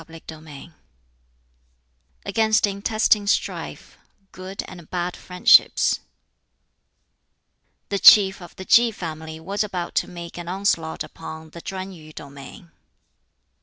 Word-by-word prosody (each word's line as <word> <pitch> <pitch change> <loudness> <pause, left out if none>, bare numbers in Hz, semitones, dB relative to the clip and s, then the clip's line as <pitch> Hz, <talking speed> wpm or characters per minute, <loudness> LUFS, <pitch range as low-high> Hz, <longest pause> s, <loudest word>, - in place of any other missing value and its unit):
BOOK 165 0 -14
XVI 155 0 -11 1.5
Against 220 +2 +2
Intestine 205 +1 +1
Strife - - -3 0.3
Good 185 +1 -7
and 170 -3 -12
Bad 180 0 -3
Friendships 180 0 +4 1.9
The 200 - -1
Chief 195 -3 +7
of 175 - -12
the 190 - -9
Ki 235 +4 +5
family 160 -5 -7
was 195 +6 -2
about 180 -4 -5
to - - -13
make 170 0 -9
an 170 - -8
onslaught 175 -4 -1
upon 160 -1 -10
the 170 - -10
Chuen 190 +1 -6
yu 155 -3 -14
domain. 140 - -12
180 Hz, 115 wpm, -22 LUFS, 160-200 Hz, 1.9 s, Chief